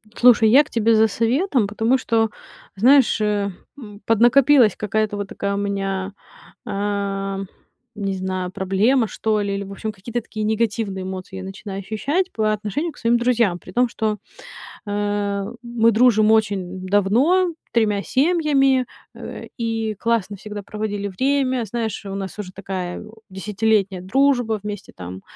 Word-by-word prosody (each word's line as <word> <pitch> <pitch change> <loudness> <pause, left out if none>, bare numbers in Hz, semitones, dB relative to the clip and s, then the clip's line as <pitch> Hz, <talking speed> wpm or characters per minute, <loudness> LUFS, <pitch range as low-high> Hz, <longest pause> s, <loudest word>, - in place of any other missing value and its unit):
Слушай, 235 -3 +6
я 270 +6 +7
к - - -18
тебе 230 0 +2
за 220 0 +5
советом, 235 - +1
потому 225 +5 +1
что, 225 -3 +1 0.5
знаешь, 250 +3 +5
э, 205 -1 0 0.3
м, 210 -5 -11
поднакопилась 240 +1 +5
какая-то 210 0 -1
вот 205 -1 -4
такая 200 0 -2
у - - -2
меня, 195 -1 -2 0.5
ам, 195 -2 -2 0.5
не 195 -2 -2
знаю, 185 -1 -3
проблема, 210 +7 +2
что 215 +2 -1
ли. 200 -1 -2
Или, 200 - -3
в 195 - -10
общем, 215 +2 -4
какие-то 230 +5 -4
такие 215 -1 -6
негативные 215 -3 -1
эмоции 190 0 -6
я 190 - -6
начинаю 195 +1 -7
ощущать 265 - -1
по 215 -1 +1
отношению 215 - -2
к - - -21
своим 235 +1 +2
друзьям. 235 -6 +2
При - - -13
том, 250 +1 +2
что, 215 -2 -2 0.7
а, 205 -1 -1 0.2
мы 235 -1 +2
дружим 220 -1 +4
очень 190 -4 0
давно, 250 - +3 0.2
3 210 -4 +2
семьями, 275 - +2 0.3
э, - - -8
и 225 -2 -2
классно 225 -3 0
всегда 210 +1 -7
проводили 205 0 -4
время. 260 +4 0
Знаешь, 220 0 -4
у 195 -1 -6
нас 195 +1 -6
уже 190 -3 -6
такая, 185 -2 -5
у, 220 +1 -15
десятилетняя 200 -1 0
дружба. 245 0 +2
Вместе 205 -1 -7
там, 90 +1 -8
215 Hz, 150 wpm, -21 LUFS, 195-235 Hz, 0.7 s, я